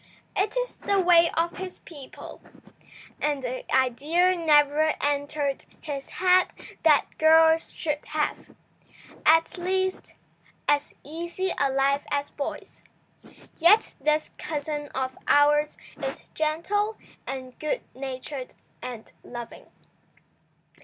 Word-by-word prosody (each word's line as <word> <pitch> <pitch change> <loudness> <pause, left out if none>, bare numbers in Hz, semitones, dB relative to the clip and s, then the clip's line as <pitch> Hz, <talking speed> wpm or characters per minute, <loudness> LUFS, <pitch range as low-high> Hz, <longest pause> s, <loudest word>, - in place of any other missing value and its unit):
It 415 +5 0
is - - -2
the 400 -1 +1
way 345 -2 +6
of 335 +1 0
his 370 -1 -6
people, 285 -6 -11 0.8
and 290 -3 0
the 255 +1 -5
idea 300 +9 +3
never 305 -2 +4
entered 285 -1 -1
his 280 -3 -6
head 365 0 +4 0.3
that 310 -3 +5
girls 320 +1 +5
should 300 -1 -3
have, 300 0 -3 0.7
at 325 +3 +4
least, 375 +1 -1 0.5
as 290 0 +1
easy 345 +5 -3
a 280 -1 +2
life 275 +1 +2
as 285 0 -1
boys. 280 - -6 0.8
Yet 415 +7 +5
this 305 +2 +1
cousin 295 -1 -3
of 260 0 -2
ours 295 +1 +4 0.3
is - - -5
gentle 395 +8 0 0.3
and 260 -2 -6
good 310 +12 -1
natured 260 0 -6 0.3
and 245 -3 -8
loving. 240 -1 -9
300 Hz, 110 wpm, -26 LUFS, 280-345 Hz, 0.8 s, way